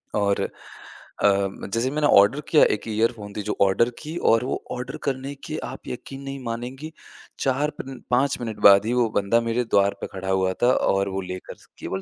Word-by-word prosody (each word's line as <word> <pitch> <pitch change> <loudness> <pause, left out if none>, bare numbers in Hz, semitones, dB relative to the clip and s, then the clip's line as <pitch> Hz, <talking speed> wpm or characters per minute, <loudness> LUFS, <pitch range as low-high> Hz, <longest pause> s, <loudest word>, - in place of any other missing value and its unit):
और, 100 -1 +1 0.8
अ, 100 -1 +1
जैसे 115 +3 +1
मैंने 150 0 +1
ऑर्डर 100 +5 +5
किया 155 - +6
एक 105 - -11
ईयरफ़ोन 110 -1 -1
थी - - -1
जो - - 0
ऑर्डर 100 +5 +4
की 155 +2 -7 0.2
और 115 +1 +3
वो - - -3
ऑर्डर 125 +4 -5
करने 135 0 -3
के 155 - -4
आप 130 +2 -9
यकीन 135 +2 -7
नहीं 135 0 -6
मानेंगी, 125 +6 -5 0.5
4 135 +3 +1
पन 135 -1 -7
5 130 +3 +2
मिनट 110 -3 -4
बाद 100 +1 +7
ही 115 - 0
वो 120 -2 +2
बंदा 100 +4 +2
मेरे 115 +1 0
द्वार 100 -2 +2
पे - - -3
खड़ा 95 0 -5
हुआ 95 -1 +1
था 125 - +6
और 100 0 +1
वो 95 0 -3
लेकर 90 0 -7
स - - -22
केवल 95 - -4
115 Hz, 200 wpm, -24 LUFS, 100-130 Hz, 0.8 s, बाद